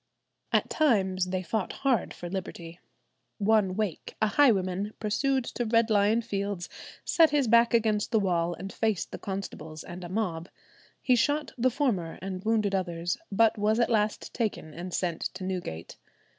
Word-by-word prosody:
At - - +2
times 190 - +2
they 185 0 -2
fought 200 +2 -2
hard 250 -8 +2
for 175 - -7
liberty. 175 -2 -6 0.6
"One 205 -3 +2
Wake, 210 -5 -3
a 220 - +2
highwayman, 200 -5 +2
pursued 265 +5 +1
to 240 - -2
Red 230 0 +3
Lion 210 +3 +3
Fields, 200 -4 -3 0.4
set 325 -2 +5
his 285 -3 +2
back 235 +1 +5
against 215 -2 +1
the 225 - +4
wall 175 -3 0
and 195 +2 -7
faced 220 -5 -1
the - - -6
constables 160 -5 -6
and 175 0 -8
mob. 180 -4 -2 0.5
He 255 - +4
shot 290 +5 +1
the 255 +1 +2
former, 230 - -1
and 185 0 -5
wounded 215 -2 +1
others, 175 -2 -1
but 220 +1 +3
was 215 +2 +2
at 235 - +2
last 210 -1 0
taken 210 -9 -3
and 175 +3 -6
sent 170 -2 -2
to - - -6
Newgate." 180 - -5
205 Hz, 160 wpm, -28 LUFS, 185-230 Hz, 0.6 s, set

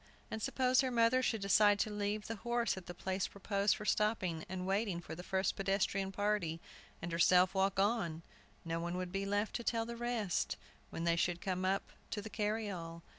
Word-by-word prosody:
And 220 - -3
suppose 255 +3 +3
her 260 - 0
mother 240 +1 +4
should 225 -4 0
decide 205 +1 +5
to 215 - -1
leave 210 +1 -2
the 225 - -4
horse 235 +1 0
at 190 -2 -9
the 175 - -5
place 190 +1 -1
proposed 200 +1 +1
for 210 - -7
stopping 190 -7 +1
and 185 0 -4
waiting 195 -2 0
for 175 - -8
the 165 - -6
first 190 +1 0
pedestrian 195 0 0
party, 200 -5 0 0.4
and 175 - -3
herself 180 +2 +5
walk 195 0 +1
on, 185 -6 +1 0.4
no 165 0 -1
one 175 +1 -3
would 180 -1 -3
be 195 +1 -2
left 205 +2 0
to 235 - -7
tell 230 -1 0
the 235 +1 -5
rest, 235 -6 -1 0.3
when 165 - -4
they 170 0 +3
should 175 0 +1
come 185 0 -2
up 195 +1 0 0.2
to 215 - -3
the 210 +1 -7
carryall. 205 -6 -3
195 Hz, 200 wpm, -35 LUFS, 180-215 Hz, 0.4 s, decide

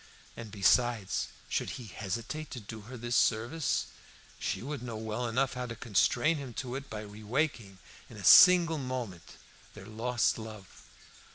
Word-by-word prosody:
And 115 -2 -8
besides, 110 0 +2 0.2
should - - -1
he 125 - -9
hesitate 115 +10 -5
to 125 - -6
do 110 +1 -9
her 130 - -7
this 120 +1 -2
service, 120 - +1 0.5
she - - -3
would 145 0 -5
know 120 -2 -6
well 110 +2 -3
enough 130 +4 0
how 125 0 -4
to 115 - -6
constrain 120 - +2
him 135 -5 -7
to 125 -1 -4
it 135 +1 -6
by 105 - -5
re 105 +1 -11
waking, 115 -5 -1 0.3
in - - -12
a - - -9
single 170 -3 +8
moment, 125 -9 -5 0.4
their 100 -2 -10
lost 115 +1 0
love. 110 -4 -10
120 Hz, 165 wpm, -30 LUFS, 110-130 Hz, 0.5 s, single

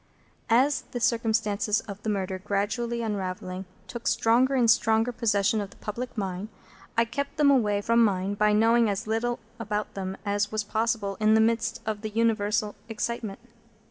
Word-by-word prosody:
As 260 +5 +3
the 245 - -2
circumstances 220 -3 +1
of 200 -2 -9
the 220 - -3
murder, 190 -2 -2
gradually 230 +5 -1
unravelling, 185 -3 -4 0.2
took 235 -1 -6
stronger 250 +4 +3
and 245 -3 +3
stronger 225 +1 +3
possession 215 -2 +1
of 200 - -5
the - - -17
public 240 +4 -6
mind, 195 0 -3 0.5
I 230 - +4
kept 280 +5 -4
them 295 -2 +5
away 210 -6 +2
from 230 +2 +3
mine 195 -2 +1
by 210 +1 +2
knowing 225 +2 +4
as 200 +2 -2
little 225 +2 -1 0.2
about 210 -1 -3
them 190 0 -4
as 205 0 0
was 215 -1 -1
possible 215 -2 -1
in 215 0 +4
the - - +5
midst 225 0 +1
of 215 -1 -3
the 215 - -4
universal 215 -1 +1 0.2
excitement. 225 -2 -3
220 Hz, 170 wpm, -27 LUFS, 205-230 Hz, 0.5 s, them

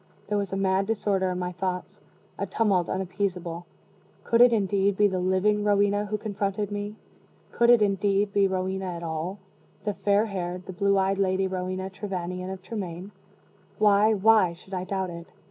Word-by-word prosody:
There 210 - +1
was 200 -1 -3
a 195 - -2
mad 195 0 +1
disorder 200 -4 0
in 180 - -2
my 180 0 -3
thoughts 180 0 -4 0.4
a - - -2
tumult 195 -6 +1
unappeasable. 180 -2 -3 0.6
Could 230 0 +3
it, 245 0 +8
indeed, 200 -2 +1
be 210 - +5
the 190 -2 -2
living 190 +3 +1
Rowena 205 0 +2
who 210 +1 -2
confronted 205 -1 -3
me? 205 +1 -4 0.6
Could 235 0 +3
it, 240 -3 +7
indeed, 200 0 +1
be 200 -1 +4
Rowena 190 0 -2
at 170 - -7
all 165 +4 -3 0.5
the 210 - -1
fair 205 +2 +2
haired, 180 -3 -4
the 190 - -7
blue 200 +2 +2
eyed 195 +1 +1
Lady 190 0 +1
Rowena 185 0 -3
Trevanion 185 -2 -4
of 190 -1 -8
Tremaine? 190 -3 -6 0.7
Why, 210 +1 +4
why 210 -3 +4
should 190 +3 -15
I 185 -1 -2
doubt 190 -1 -2
it? 170 0 -9
195 Hz, 175 wpm, -26 LUFS, 185-205 Hz, 0.7 s, it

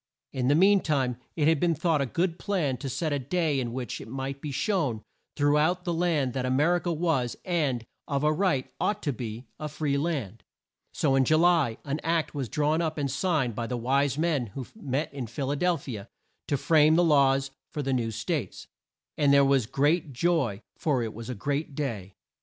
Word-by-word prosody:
In 125 -2 -1
the 145 - +4
mean 195 +4 +6
time 135 -8 0 0.2
it 150 -2 +2
had 160 -2 +4
been 170 0 +2
thought 160 -1 +1
a 135 - 0
good 170 +5 -1
plan 175 -10 0
to 135 - -5
set 155 +3 -1
a 145 - 0
day 150 +1 0
in 120 -2 -2
which 125 0 -4
it - - -9
might 135 +3 -5
be 150 - -4
shown 140 - 0 0.3
through 145 +1 +3
out 175 +4 +1
the 175 - -1
land 165 -7 +1
that 130 - -2
A 130 - -1
mer 150 +7 +3
i - - -2
ca 175 - -3
was, 155 -7 0
and, 145 - 0 0.2
of 140 -1 -1
a 150 0 +3
right, 155 -7 +1
ought 210 0 0
to 145 - 0
be, 115 0 -6
a 150 - -4
free 145 -2 -1
land. 135 - -3 0.5
So 135 - +1
in 135 0 +4
Ju 155 +4 +3
ly 165 -9 +3
an 145 +2 -2
Act 165 0 0
was 135 -6 -3
drawn 150 +6 +1
up 160 -1 -2
and 140 -3 -1
signed 145 -4 0
by 115 +2 -3
the 125 - -2
wise 135 +3 +1
men 155 -6 +1
who 125 +6 -7
met 145 - -3
in 130 -4 -5
Phil 135 +4 -3
a - - 0
del 175 +3 +1
phi 125 -8 -6
a 100 +2 -10 0.4
to 145 - +1
frame 155 +1 +4
the 175 - +4
laws 135 -3 +3 0.2
for 150 - -4
the 135 0 0
new 120 -3 0
States, 125 - -3 0.5
and 145 -2 +4
there 140 0 +6
was 135 -5 +2
great 145 +3 +1
joy, 130 - 0
for 135 -6 0
it 110 -1 -4
was 115 +2 -8
a 125 - -3
great 140 +6 -2
day. 110 -10 -4
145 Hz, 220 wpm, -27 LUFS, 130-160 Hz, 0.5 s, mean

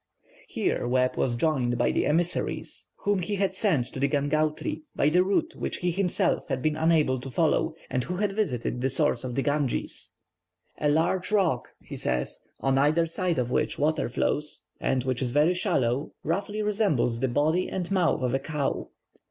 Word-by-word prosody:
Here - - -1
Webb 125 +1 +2
was 120 -2 0
joined 125 -3 +1
by 120 - +2
the - - +1
emissaries 170 +3 -1 0.2
whom 205 -1 +2
he 205 +4 -2
had 195 -1 0
sent 185 - +1
to - - -5
Gangautri 155 +2 0
by 145 - +3
the 180 +4 +4
route 195 +1 0
which - - -3
he 175 0 0
himself 185 0 0
had 135 -3 -2
been 155 -1 +1
unable 155 -5 +2
to 135 - -7
follow, 125 - +1
and 125 - -1
who 180 - -4
had 205 +2 0
visited 125 - -1
the 135 - +1
source 135 -2 +1
of 125 -2 -4
the 135 - 0
Ganges. 145 -3 -2 0.7
"A 150 - +2
large 170 +6 +1
rock," 180 - +2 0.2
he - - -8
says, 65 0 -2 0.2
"on 135 0 +2
either 155 +4 +3
side 170 0 -1
of 125 -1 -1
which - - 0
water 155 -2 +1
flows, 150 +5 -1
and 130 -2 0
which 130 -1 -1
is 130 - +1
very 150 +7 +3
shallow, 135 -5 0
roughly 200 +6 -1
resembles 195 - +1
the 130 - +1
body 155 +8 +1
and 185 -1 -3
mouth 180 -8 +2
of 125 -1 0
a 135 - +2
cow. 145 -1 -2
150 Hz, 185 wpm, -27 LUFS, 130-180 Hz, 0.7 s, the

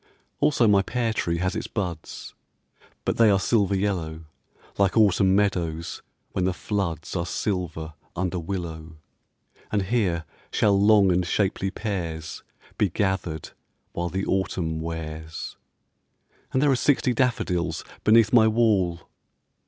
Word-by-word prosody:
Also 125 -6 +3
my 100 -2 +5
pear 115 +2 -1
tree 85 -5 -1
has 90 +2 -1
its - - -3
buds, 90 -7 -5 0.7
But - - 0
they 115 -2 +6
are 100 -2 +4
silver 100 -2 +2
yellow, 90 -5 -2 0.6
Like 100 +2 +2
autumn 95 -3 +4
meadows 85 -5 -1 0.3
when 95 - -1
the 90 0 0
floods 90 -6 -3
Are 85 - 0
silver 85 -5 -3 0.2
under 90 0 -1
willow, 80 -3 -5 0.7
And 105 -2 +1
here 95 -6 0 0.3
shall 105 - +3
long 100 -1 +5
and 90 +1 +2
shapely 95 +1 0
pears 85 -7 -4 0.4
Be 105 - +3
gathered 90 -5 -2 0.4
while 85 0 -2
the 95 +2 -2
autumn 90 -4 -1
wears. 80 -1 -6 1.0
And 130 - +2
there 145 - +4
are - - +4
sixty 130 -1 +2
daffodils 90 -9 0 0.2
Beneath 110 +1 +5
my 110 -2 +7
wall.... 105 -7 +2
95 Hz, 130 wpm, -25 LUFS, 85-105 Hz, 1.0 s, my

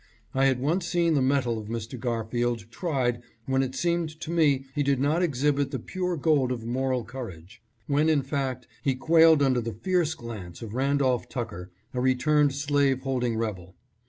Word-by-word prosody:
I 135 +1 +3
had 130 -2 +2
once 165 +7 0
seen 170 -2 +2
the 145 - +2
mettle 130 -4 +1
of 105 - -8
Mr. 115 +2 -5
Gar 115 -2 -2
field 120 -1 -1
tried 125 -5 -1 0.2
when 130 0 +1
it 130 -1 -3
seemed 170 0 -1
to 165 - -5
me 145 -5 +3
he 145 - 0
did 140 -2 +2
not 150 +5 +2
exhibit 145 -3 +1
the - - -3
pure 180 -2 -3
gold 140 -4 +2
of 115 -3 -4
moral 130 +1 -1
courage; 115 -3 -9 0.2
when, 150 +2 +2
in 150 -3 +3
fact, 135 -2 -3 0.2
he 135 -4 +1
quailed 160 +1 +5
under 130 -3 +2
the 115 0 -4
fierce 175 -4 +1
glance 110 - -8
of 110 -2 -7
Randolph 130 -2 +1
Tucker, 110 -8 -5 0.2
a 125 - -1
returned 140 +2 +3
slave 140 -2 +1
holding 125 -3 -1
rebel. 95 -5 -4
135 Hz, 185 wpm, -27 LUFS, 120-150 Hz, 0.2 s, quailed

